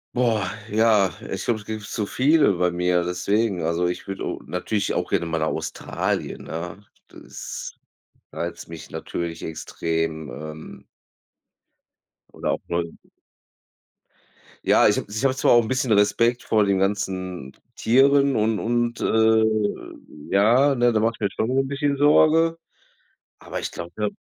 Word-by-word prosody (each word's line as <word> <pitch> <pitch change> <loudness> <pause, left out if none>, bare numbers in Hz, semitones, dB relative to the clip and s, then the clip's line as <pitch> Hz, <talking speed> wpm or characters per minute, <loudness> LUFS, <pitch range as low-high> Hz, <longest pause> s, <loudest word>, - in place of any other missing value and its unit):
Boah, 110 -6 +1 0.2
ja, 105 -4 +3 0.2
ich - - -4
glaube, 115 -2 0
es 105 - -14
gibt 110 0 -5
zu 105 -1 -3
viele 145 +1 +3
bei 90 0 +1
mir, 90 0 +1
deswegen. 95 +2 0
Also 85 +2 0
ich 90 - -4
würde, 95 - -5
äh, - - -3
natürlich 95 +3 -2
auch - - -2
gerne - - 0
mal 80 0 -2
nach 80 - 0
Australien, - - -3
ne? 85 +4 -6 0.3
Das - - -8 0.6
reizt 85 0 -5
mich 80 -1 -10
natürlich 85 -1 -5
extrem, 80 -1 -3
ähm 75 0 -9 1.5
oder - - -2
auch - - -2
Neu 85 0 0 1.8
Ja, - - +5
ich - - +3
habe - - -3
ich 110 +5 -4
habe 130 -1 +2
zwar - - +2
auch 120 -1 +7
'n - - -5
bisschen 130 0 0
Respekt 115 +4 +3
vor 110 -2 +2
den 100 -1 +1
ganzen 95 -7 -2 0.2
Tieren 140 +3 +4
und 110 0 +1
und, 120 0 -1
äh, 110 0 +4 0.9
ja, 125 +8 +5
ne, 120 -1 +3
da 110 - +1
mache 115 +1 +1
mir 100 - 0
schon 110 - -2
'n 135 +1 +1
bisschen 140 0 -1
Sorge. 160 +3 +4 0.8
Aber - - -6
ich - - -4
glaube, 85 0 -7
da 105 -1 -1
105 Hz, 150 wpm, -23 LUFS, 90-120 Hz, 1.8 s, auch